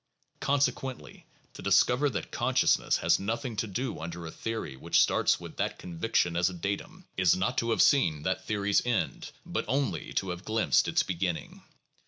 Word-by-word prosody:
Consequently 135 Hz, -2 st, -1 dB, 0.3 s
to -, -, -10 dB
discover 125 Hz, +9 st, +3 dB
that 115 Hz, -, -5 dB
consciousness -, -, +2 dB
has -, -, +2 dB
nothing 115 Hz, +4 st, -3 dB
to 110 Hz, -, -1 dB
do 120 Hz, +6 st, -3 dB
under 85 Hz, +1 st, -6 dB
a 80 Hz, -, -6 dB
theory 115 Hz, -11 st, -4 dB
which 65 Hz, -, +1 dB
starts -, -, +3 dB
with -, -, -10 dB
that -, -, -1 dB
conviction 85 Hz, 0 st, -1 dB
as 85 Hz, +2 st, +2 dB
a 90 Hz, -, -8 dB
datum, 100 Hz, +4 st, -5 dB
is 95 Hz, -2 st, +4 dB
not 95 Hz, +1 st, -1 dB
to 115 Hz, -, -1 dB
have 110 Hz, -, +4 dB
seen 80 Hz, -, +3 dB
that 95 Hz, +2 st, -1 dB
theory's 100 Hz, -1 st, +1 dB
end, 110 Hz, -, -1 dB, 0.2 s
but -, -, -2 dB
only 135 Hz, +4 st, -1 dB
to 95 Hz, -, -1 dB
have 90 Hz, +1 st, -6 dB
glimpsed 110 Hz, +1 st, +2 dB
its -, -, +2 dB
beginning. 90 Hz, -1 st, -3 dB
100 Hz, 175 wpm, -29 LUFS, 90-120 Hz, 0.3 s, is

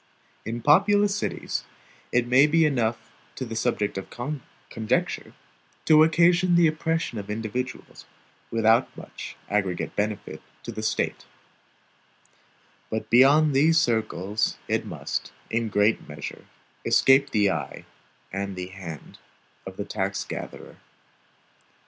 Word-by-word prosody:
In 115 Hz, +1 st, -4 dB
populous 200 Hz, -, +4 dB
cities, -, -, -3 dB, 0.5 s
it 125 Hz, 0 st, +2 dB
may 130 Hz, +4 st, +5 dB
be 160 Hz, +1 st, +4 dB
enough 120 Hz, -6 st, -1 dB, 0.3 s
the 115 Hz, -3 st, -5 dB
subject 105 Hz, -3 st, -1 dB
of 95 Hz, -, -10 dB, 0.6 s
conjecture, 110 Hz, -1 st, -1 dB, 0.5 s
to 155 Hz, -1 st, +7 dB
occasion 175 Hz, +2 st, +4 dB
the 170 Hz, 0 st, +6 dB
oppression 160 Hz, -5 st, -1 dB
of 100 Hz, -, -8 dB
individuals, 115 Hz, +4 st, -5 dB, 0.4 s
without 115 Hz, +2 st, +2 dB
much -, -, -9 dB
aggregate 100 Hz, -4 st, -1 dB
benefit 105 Hz, -1 st, -3 dB, 0.2 s
to -, -, -6 dB
the 110 Hz, -, -6 dB
State; 110 Hz, -, -2 dB, 1.6 s
but 110 Hz, -, -4 dB
beyond 140 Hz, +5 st, +6 dB
these 160 Hz, +5 st, +4 dB
circles, 110 Hz, -, 0 dB
it -, -, -1 dB
must, -, -, -4 dB, 0.2 s
in 115 Hz, +1 st, 0 dB
a -, -, -5 dB
great 105 Hz, +2 st, +1 dB
measure, 75 Hz, -1 st, -8 dB, 0.4 s
escape 135 Hz, +1 st, +4 dB
the 105 Hz, -5 st, +2 dB
eye 85 Hz, -, -5 dB, 0.5 s
and 100 Hz, 0 st, -3 dB
the 90 Hz, 0 st, -5 dB
hand 90 Hz, -5 st, -9 dB, 0.5 s
of -, -, -9 dB
the -, -, -3 dB
tax -, -, -2 dB
gatherer. -, -, -8 dB
115 Hz, 120 wpm, -25 LUFS, 105-155 Hz, 1.6 s, to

